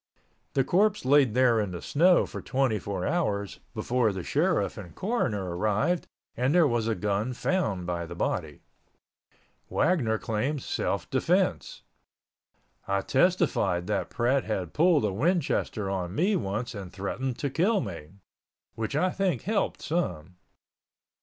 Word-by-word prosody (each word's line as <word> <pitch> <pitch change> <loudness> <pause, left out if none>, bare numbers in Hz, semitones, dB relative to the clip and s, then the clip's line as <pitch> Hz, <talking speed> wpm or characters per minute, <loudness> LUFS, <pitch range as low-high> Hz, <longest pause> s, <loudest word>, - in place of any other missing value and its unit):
The 135 - +4
corpse 200 +4 +2
laid 135 -4 +4
there 125 -3 +4
in 105 -2 -1
the 90 -1 -6
snow 175 +4 +4
for - - -7
twenty 130 -5 0
four 95 -1 -4
hours 105 - -1 0.2
before 120 -3 +1
the 95 -2 -5
sheriff - - +1
and 85 -3 -10
coroner 105 - -1
arrived 110 - 0 0.3
and 130 +6 +1
there 175 -2 +6
was 120 -3 0
a 115 - +1
gun 105 +4 -1
found 115 - -1
by 85 -1 -3
the 85 - -8
body. 80 -3 -2 1.1
Wagner 140 -10 +2
claimed 125 +7 -2
self - - -2
defense. - - 0 1.0
I 100 0 +1
testified 130 - +2
that 105 +1 -1
Pratt 125 +2 +1
had 95 -6 -3
pulled 160 -6 +4
a 100 - -1
Winchester 140 - 0
on 95 -1 -3
me 195 - +2
once 110 - -2
and 100 -4 -7
threatened 120 +7 -3
to 140 - -2
kill 195 - +2
me—which 95 - -8
I 180 +5 +2
think 190 -2 -1
helped 210 0 -1
some. 90 - -2
115 Hz, 140 wpm, -27 LUFS, 100-150 Hz, 1.1 s, there